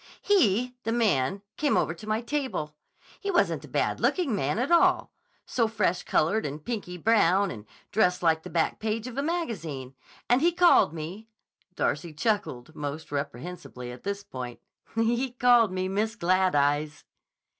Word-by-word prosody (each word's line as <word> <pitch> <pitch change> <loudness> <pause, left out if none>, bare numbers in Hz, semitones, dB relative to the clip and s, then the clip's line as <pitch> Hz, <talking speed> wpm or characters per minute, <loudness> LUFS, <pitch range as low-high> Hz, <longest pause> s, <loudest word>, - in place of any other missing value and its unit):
"He—the 250 - +2
man—came 200 - 0
over 160 - +1
to 215 +6 -12
my 215 +1 0
table. 235 - -3 0.4
He 400 - -4
wasn't 350 -3 +1
a - - -13
bad - - -1
looking 320 - +1
man 150 -1 -1
at 255 +7 -1
all; 350 +1 +4 0.3
so 230 -3 +1
freshcolored 210 -1 +1
and 150 +1 -6
pinky 205 -7 -4
brown, 200 -1 +3
and 105 -3 -9 0.2
dressed 180 -3 +2
like 160 -1 +3
the - - -9
back 165 -2 0
page 220 +1 -2
of 255 -2 -7
a 275 - 0
magazine. 175 - -3 0.3
And 245 +2 +3
he 340 +2 +3
called 350 - +5
me"—Darcy 175 -2 -5
chuckled 160 - -1
most 145 +2 -5
reprehensibly 140 -2 -5
at 125 - -10
this 200 0 -4
point—"he 225 - -3
called 245 -4 +4
me 185 0 -2
Miss 215 +4 -1
Glad 185 -2 +2
Eyes." 145 +1 +1
200 Hz, 145 wpm, -27 LUFS, 155-235 Hz, 0.4 s, called